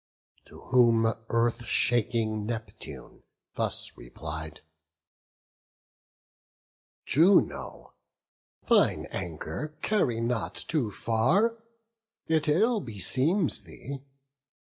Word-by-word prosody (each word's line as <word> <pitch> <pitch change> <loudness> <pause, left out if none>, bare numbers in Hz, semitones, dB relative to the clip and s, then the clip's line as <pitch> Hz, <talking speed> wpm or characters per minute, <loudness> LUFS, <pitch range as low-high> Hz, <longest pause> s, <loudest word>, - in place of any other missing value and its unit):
To - - -14
whom 120 -3 +4 0.2
Earth 115 +1 +1
shaking 115 -2 +1
Neptune 110 -3 -7 0.3
thus - - -2
replied: 80 +5 -7 2.4
"Juno, 175 +7 +2 0.7
thine - - +4
anger 90 - -5
carry 155 - +1
not 115 -1 -2
too 145 -10 -1
far; 135 - +1 0.7
It 160 -1 +1
ill 215 +10 +3
beseems 135 - +1
thee. 140 0 -8
120 Hz, 75 wpm, -28 LUFS, 110-155 Hz, 2.4 s, whom